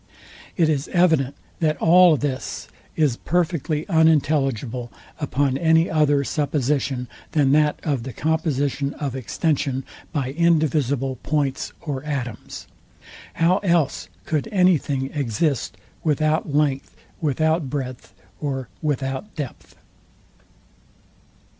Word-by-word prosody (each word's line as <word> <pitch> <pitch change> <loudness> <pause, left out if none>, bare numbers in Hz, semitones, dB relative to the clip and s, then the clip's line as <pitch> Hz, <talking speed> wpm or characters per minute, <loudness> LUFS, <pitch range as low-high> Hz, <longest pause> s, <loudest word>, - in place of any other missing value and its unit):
It 165 -3 +4
is 145 -2 0
evident 160 -7 +2 0.2
that 155 -2 +1
all 175 -1 +6
this 140 -2 -3 0.3
is 145 -7 +2
perfectly 165 -3 -1
unintelligible 140 - +2 0.3
upon 140 -2 0
any 160 +1 +3
other 145 -3 +3
supposition 140 -3 -1 0.3
than 145 -4 +3
that 150 0 +3
of 140 -6 0
the 130 +3 -6
composition 145 -1 -1
of 140 -4 -4
extension 135 0 -1 0.3
by 135 -3 -2
indivisible 145 -5 +1
points 140 0 -1
or 140 -4 -4
atoms. 130 -7 -5 0.7
How 175 +4 +3
else 150 - +1 0.2
could 155 +6 -1
any 185 -5 +4
thing 135 -1 -3
exist 140 0 -1 0.3
without 155 +1 +1
length, 140 -2 0 0.3
without 155 0 +1
breadth, 130 -3 -5 0.3
or 135 -4 -3
without 140 +5 -2
depth? 145 -6 -7
145 Hz, 105 wpm, -23 LUFS, 135-160 Hz, 0.7 s, all